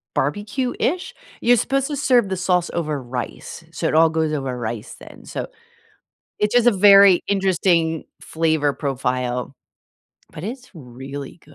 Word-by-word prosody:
barbecue-ish? 250 Hz, -, -2 dB, 0.3 s
You're 245 Hz, 0 st, +4 dB
supposed 275 Hz, +4 st, 0 dB
to 290 Hz, -, -4 dB
serve 245 Hz, -6 st, +3 dB
the 190 Hz, -, -2 dB
sauce 180 Hz, -1 st, 0 dB
over 155 Hz, -4 st, -2 dB
rice, 120 Hz, -, -7 dB
so -, -, -2 dB
it -, -, -3 dB
all 165 Hz, +1 st, +6 dB
goes 160 Hz, -1 st, -1 dB
over 135 Hz, -4 st, -3 dB
rice 115 Hz, -1 st, -5 dB
then. -, -, -13 dB
So -, -, -5 dB, 0.9 s
it's 210 Hz, +2 st, 0 dB
just 245 Hz, 0 st, +5 dB
a -, -, +4 dB
very 200 Hz, -2 st, +7 dB
interesting 175 Hz, -4 st, +1 dB, 0.2 s
flavor 160 Hz, -3 st, 0 dB
profile, 130 Hz, -2 st, -3 dB, 0.8 s
but 155 Hz, -, -9 dB
it's 250 Hz, +5 st, -7 dB
really 135 Hz, +1 st, -9 dB
165 Hz, 140 wpm, -21 LUFS, 135-205 Hz, 0.9 s, very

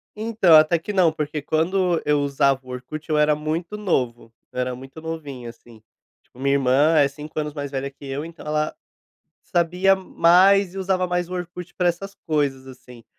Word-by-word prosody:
Então, 215 Hz, -6 st, +4 dB
até 155 Hz, +2 st, +5 dB
que 205 Hz, +5 st, -6 dB
não, 180 Hz, -4 st, +4 dB
porque 150 Hz, -1 st, -4 dB
quando 175 Hz, +3 st, +1 dB
eu 150 Hz, -1 st, +2 dB
usava 140 Hz, -1 st, +2 dB
o 130 Hz, -, -16 dB
Orkut, 130 Hz, +6 st, -7 dB
eu 155 Hz, -, +2 dB
era 150 Hz, 0 st, +4 dB
muito 165 Hz, +6 st, -4 dB
novo, 125 Hz, -, -2 dB, 0.2 s
eu 125 Hz, -, -6 dB
era 125 Hz, 0 st, -1 dB
muito 135 Hz, +5 st, -11 dB
novinho, 145 Hz, -7 st, -6 dB
assim. 115 Hz, -2 st, -16 dB, 0.4 s
Tipo, 125 Hz, -, -21 dB
minha 140 Hz, +1 st, +2 dB
irmã 140 Hz, +4 st, +3 dB
é 145 Hz, -2 st, +5 dB
5 150 Hz, +2 st, -7 dB
anos 150 Hz, -1 st, -3 dB
mais 145 Hz, -2 st, -5 dB
velha 135 Hz, 0 st, -3 dB
que 140 Hz, -, -14 dB
eu, 135 Hz, +3 st, -4 dB
então, 165 Hz, -1 st, -11 dB
ela 150 Hz, 0 st, -1 dB, 0.7 s
sabia 180 Hz, +3 st, +2 dB
mais 185 Hz, +1 st, +4 dB
e -, -, -6 dB
usava 185 Hz, -1 st, 0 dB
mais 180 Hz, -1 st, -1 dB
o 185 Hz, -, -6 dB
Orkut 180 Hz, 0 st, -7 dB
pra 180 Hz, -1 st, +1 dB
essas 195 Hz, +3 st, -4 dB
coisas, 140 Hz, -4 st, -1 dB
assim, 125 Hz, -2 st, -14 dB
155 Hz, 190 wpm, -22 LUFS, 140-180 Hz, 0.7 s, até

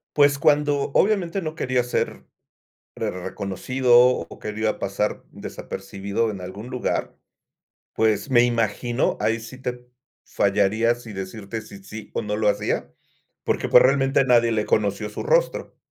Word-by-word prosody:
Pues, 145 Hz, -1 st, +4 dB
cuando, 145 Hz, -1 st, +2 dB
obviamente, 195 Hz, -3 st, +2 dB
no 155 Hz, -1 st, -4 dB
quería 130 Hz, -4 st, 0 dB
ser 120 Hz, -, -2 dB, 0.7 s
rer -, -, -2 dB
reconocido 100 Hz, +7 st, -1 dB
o 125 Hz, -, -3 dB
quería 110 Hz, 0 st, -2 dB
pasar 100 Hz, +2 st, -2 dB
desapercibido 100 Hz, +3 st, -4 dB
en 100 Hz, -3 st, -6 dB
algún 95 Hz, +6 st, -8 dB
lugar, 125 Hz, -1 st, -2 dB, 0.8 s
pues, 110 Hz, +2 st, +1 dB
me 120 Hz, -2 st, +5 dB
imagino, 120 Hz, +1 st, 0 dB
ahí 115 Hz, +1 st, +1 dB
sí 115 Hz, +3 st, -10 dB
te 125 Hz, -1 st, -6 dB, 0.4 s
fallaría 105 Hz, +4 st, +2 dB
si 120 Hz, -3 st, -11 dB
decirte 100 Hz, +3 st, -6 dB
si 100 Hz, -2 st, -12 dB
sí 110 Hz, +2 st, -10 dB
o -, -, -1 dB
no 105 Hz, -1 st, -2 dB
lo 105 Hz, -1 st, +2 dB
hacía, -, -, -1 dB, 0.5 s
porque, -, -, 0 dB
pues, -, -, +8 dB
realmente, 135 Hz, 0 st, +3 dB
nadie 120 Hz, -2 st, +4 dB
le 105 Hz, -2 st, 0 dB
conoció 105 Hz, 0 st, 0 dB
su 105 Hz, -, -6 dB
rostro. -, -, 0 dB
115 Hz, 145 wpm, -23 LUFS, 105-130 Hz, 0.8 s, pues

